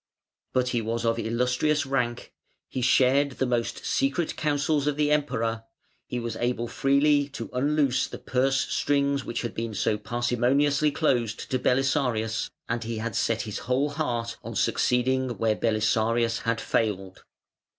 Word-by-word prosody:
But 125 -1 +1
he 120 -2 0
was 115 +1 -2
of 115 0 +1
"Illustrious" 125 +6 +1
rank, 125 -3 -2 0.3
he 130 - -4
shared 135 +3 +3
the 130 - -1
most 120 -2 -2
secret 230 - 0
counsels 145 -1 0
of 150 -1 0
the 150 0 +2
Emperor, 115 -6 0 0.4
he 125 - -3
was 115 -2 -4
able 120 -1 -1
freely 140 +3 +2
to 115 - -6
unloose 140 0 +1
the - - -8
purse 135 +1 +1
strings 140 -1 0
which 120 - -4
had 120 - -4
been 115 -1 -4
so 105 +2 0
parsimoniously 125 +6 +1
closed 120 -7 -1
to 130 - +1
Belisarius, 125 -4 +1 0.2
and 115 0 -2
he 115 0 -4
had 110 -1 -4
set 115 -1 0
his 105 -2 -5
whole 135 +3 +1
heart 120 -6 -2
on - - -7
succeeding 130 0 +1
where 110 -1 +1
Belisarius 115 +1 +1
had 115 0 -1
failed. 95 -4 -2
125 Hz, 150 wpm, -26 LUFS, 115-140 Hz, 0.4 s, shared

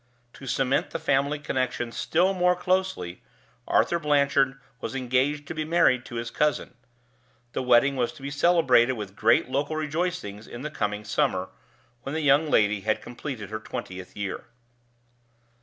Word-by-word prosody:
To 135 - -11
cement 135 +1 +1
the - - -3
family 140 +2 +1
connection 130 -4 -2
still 180 +10 +1
more 180 -1 +3
closely, 180 - -1 0.5
Arthur 170 - +2
Blanchard 140 -3 +2 0.2
was 135 - -5
engaged 135 +3 0
to - - -4
be 155 -1 -2
married 155 -6 +3
to 120 - -9
his 115 0 -4
cousin. 150 -3 0 0.8
The - - -1
wedding 125 +2 +4
was 120 -2 0
to 135 - -14
be 140 - -4
celebrated 140 -6 +4
with 105 -5 -7
great 115 +3 +3
local 145 +4 -1
rejoicings 155 - -3
in 120 +2 -8
the 150 - -4
coming 105 -5 -2
summer, 95 -2 0 0.5
when 140 +4 -5
the 160 - -1
young 145 +2 +4
lady 105 -5 +3
had 110 +2 0
completed 120 -4 -7
her 110 - -3
twentieth 95 -3 -7
year. 100 -2 -4
135 Hz, 155 wpm, -26 LUFS, 115-150 Hz, 0.8 s, wedding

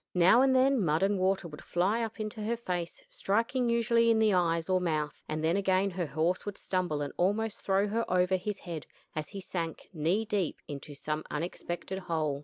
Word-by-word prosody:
Now 180 +7 +6
and 265 -1 +4
then 260 -3 +4
mud 160 +1 +2
and 200 0 +2
water 190 -1 +1
would 150 -2 -10
fly 195 +7 +1
up 225 0 -4
into 215 0 -4
her 230 +3 -1
face 175 -6 -4
striking 230 +4 0
usually 235 0 +3
in 225 - +4
the 220 -2 +4
eyes 170 -2 +2
or 185 -1 +2
mouth 155 -4 -1
and 155 0 -2
then 165 +2 +2
again 195 0 +2
her 175 -2 -2
horse 160 +6 0
would 205 -1 -5
stumble 175 -6 -1
and 145 - -5
almost 210 +4 0
throw 195 +1 +2
her 225 +3 0
over 180 +1 +3
his 195 +2 -3
head, 165 -4 -6 0.3
as 155 -1 -3
he 200 - -6
sank, 170 -3 -5
knee 175 +7 +1
deep, 205 -6 -1
into 145 0 -7
some 150 +2 -3
unexpected 175 +4 -4
hole. 155 -6 -1
185 Hz, 205 wpm, -30 LUFS, 165-215 Hz, 0.3 s, Now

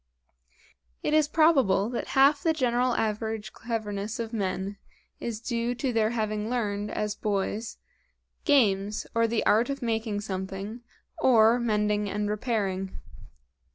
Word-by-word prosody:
It - - 0
is 310 -1 +4
probable 275 - +4
that 240 - -3
half 280 +2 +6
the 325 +1 +2
general 250 -3 +1
average 220 -1 -2
cleverness 215 -2 -4
of 230 0 -4
men 195 -1 -2 0.4
is 230 -2 -4
due 235 +1 -2
to 250 +1 -2
their 220 -1 +2
having 215 -2 -2
learned, 210 -4 -1
as 210 -1 -2
boys, 210 +2 -2 0.7
games, 210 -7 +2
or 230 0 +3
the 225 0 -1
art 225 +5 +4
of 275 -1 -3
making 220 -3 -1
something, 195 +3 -5 0.4
or 235 -1 +5
mending 210 -3 +1
and 205 +1 -2
repairing. 200 -4 -2
220 Hz, 130 wpm, -27 LUFS, 205-240 Hz, 0.7 s, half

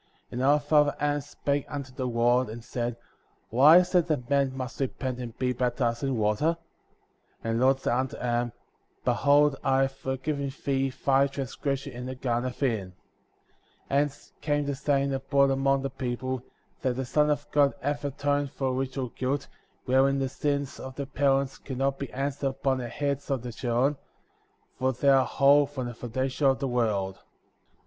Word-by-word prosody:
53. - - -7
And 125 - -1
our 145 +2 +5
father 145 0 +3
Adam 145 0 +1
spake 140 0 -2
unto 140 -3 -6
the 130 0 -3
Lord,*^ 120 0 +2
and 115 +1 -8
said: 120 0 -3 0.5
Why 140 +8 +8
is 180 +1 +2
it 175 -2 +4
that 145 -5 -2
men 140 -1 +3
must 130 -1 -5
repent 130 -1 -2
and 120 -3 -7
be 125 -1 0
baptized 120 -1 -1
in 135 -3 0
water? 110 +11 +1 0.9
And 115 +1 0
the - - +5
Lord 135 0 +4
said - - 0
unto 130 +1 -1
Adam: 120 0 -1 0.5
Behold 145 0 +4
I 135 0 +3
have 135 - 0
forgiven 135 +1 -3
thee 135 -1 +1
thy 135 +1 +2
transgression 135 0 -4
in 125 +1 -6
the 130 - -5
Garden 125 0 -1
of 125 - -6
Eden.* 105 -8 -1 1.0
54. - - 0
Hence 145 -1 -3
came 145 -1 0
the 140 - -1
saying 140 0 0
abroad 135 +1 +2
among 135 0 +2
the 135 - -2
people. 130 0 -3 0.4
That 125 -1 0
the 130 +1 -2
Son 150 +4 +2
of 145 0 0
God 145 -1 +3
hath 145 +1 -2
atoned 145 0 0
for 130 -2 -1
original 130 0 -2
guilt,*' 130 +4 -2 0.4
wherein 135 +1 +3
the 135 -1 -1
sins 140 0 -2
of 130 0 -8
the 140 - -3
parents 135 0 +1
can 130 -3 -7
not 135 +1 0
be 140 - -5
answered 140 +1 -2
upon 135 0 0
the 120 -1 -4
heads 140 +1 -2
of 135 -4 -1
the 120 -2 -6
children, 125 +4 0 0.8
for 130 +1 +1
they 140 +3 +2
are 135 -1 +5
whole 140 +1 +5
from 135 -3 -5
the 120 - -5
foundation 130 +4 -1
of 135 -1 +3
the 135 0 -2
world. 105 -6 0
135 Hz, 185 wpm, -27 LUFS, 125-140 Hz, 1.0 s, Why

